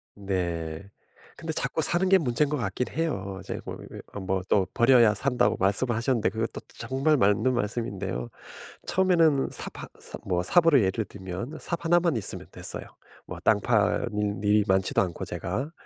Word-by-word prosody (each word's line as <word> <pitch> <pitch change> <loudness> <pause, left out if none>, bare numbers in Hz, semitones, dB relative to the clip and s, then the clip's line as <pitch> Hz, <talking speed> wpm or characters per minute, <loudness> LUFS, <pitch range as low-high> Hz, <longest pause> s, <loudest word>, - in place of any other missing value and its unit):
네. 90 -3 -3 0.5
근데 160 -1 -4
자꾸 160 +1 -1
사는 175 +5 +2
게 190 0 +6
문제인 140 -1 +1
것 150 - 0
같긴 120 -1 -2
해요. 100 -12 -3
이제 - - -5
뭐 - - -5 0.2
이 - - -8
어 - - -5
뭐 95 0 -1
또 95 -1 +3
"버려야 120 -3 +5
산다."고 125 +2 +1
말씀을 100 +6 +2
하셨는데 115 -1 +1
그것도 110 +1 -4 0.2
정말 140 +3 +1
맞는 105 +5 +3
말씀인데요. 110 - -3 0.6
처음에는 165 -7 +3
삽 - - -4
하 - - -7
사 - - -9
뭐 90 -2 0
삽으로 165 - +5
예를 100 +3 0
들면 100 - -7
삽 170 - -4
하나만 170 -4 +3
있으면 110 - -3
됐어요. - - -2 0.4
뭐 - - -7
땅 105 -2 +4
파는 105 -2 0
일이 105 +1 +4
많지도 95 0 +2
않고, 90 -3 -2
제가. 125 - -4
115 Hz, 325 characters per minute, -26 LUFS, 95-140 Hz, 0.6 s, 게